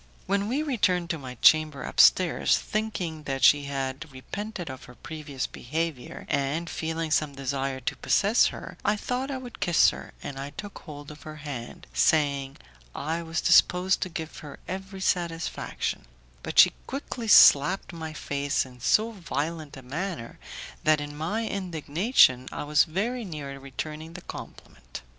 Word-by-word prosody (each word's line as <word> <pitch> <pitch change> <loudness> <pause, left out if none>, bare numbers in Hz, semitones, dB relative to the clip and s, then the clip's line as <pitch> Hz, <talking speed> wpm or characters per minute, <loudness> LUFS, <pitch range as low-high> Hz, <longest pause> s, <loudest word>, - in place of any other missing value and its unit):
When 200 +1 0
we 270 +7 0
returned 185 - +1
to 165 - -3
my 130 -2 -8
chamber 155 -2 +5
upstairs, 180 -3 +4
thinking 190 -7 -3
that 135 -1 -3
she 145 -1 +6
had 135 +1 -4
repented 185 +8 -6
of 130 -1 -8
her 125 - -14
previous 150 -4 -5
behaviour, 155 -1 -4
and 140 +5 -1
feeling 160 0 -3
some 150 -2 +1
desire 135 0 -2
to 125 - -2
possess 210 +4 +3
her, - - -8
I 205 - +2
thought 250 +5 -3
I 270 - -3
would 250 -2 -9
kiss 175 -2 +4
her, - - -9
and 135 -1 -6
I 140 +1 -6
took 205 -1 -7
hold 145 -2 -10
of 150 - -13
her 155 0 -9
hand, 145 -6 -7
saying 140 -3 +2 0.4
I 160 +4 -2
was 165 0 -3
disposed 180 +2 +4
to 185 - -1
give 160 -2 -6
her 145 -2 -10
every 190 +1 -6
satisfaction, 170 -3 -2 0.4
but - - -6
she - - +8
quickly 255 -3 -5
slapped 180 -1 +6
my 160 -1 -6
face 145 -2 -1
in 125 -1 -14
so 215 - +3
violent 160 -6 -4
a 135 - -11
manner 150 -1 -5 0.4
that, 155 -1 +4
in 145 0 -6
my 175 +10 -2
indignation, 165 - +2
I - - -4
was 150 +1 +4
very 225 +9 -2
near 145 -7 -6
returning 155 +4 -7
the 180 - -8
compliment. - - -10
155 Hz, 160 wpm, -27 LUFS, 140-185 Hz, 0.4 s, she